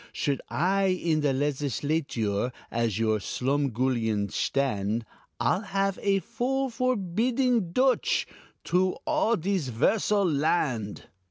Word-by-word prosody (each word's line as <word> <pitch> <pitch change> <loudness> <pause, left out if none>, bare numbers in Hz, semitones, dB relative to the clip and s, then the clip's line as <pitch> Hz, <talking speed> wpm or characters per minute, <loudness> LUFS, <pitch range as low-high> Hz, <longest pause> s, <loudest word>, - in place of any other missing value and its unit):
Should 140 -2 -1
I 195 +4 +1
in 170 -4 +1
the 145 -2 +2
Legisladure 135 -5 -1 0.2
As 115 -3 0
your 110 -1 +1
slumgullion 125 -4 0
shtand, 115 -5 0 0.4
I'll 120 +11 +1
have 195 -1 -1
a 195 -1 +2 0.2
bill 270 +1 +1
forbidding 235 -1 +1
Dutch 255 +6 +2 0.4
Troo 185 +1 +2
all 305 -7 +2
dis 180 - -1
'versal 200 - +2
land. 140 - 0
155 Hz, 105 wpm, -27 LUFS, 125-195 Hz, 0.4 s, the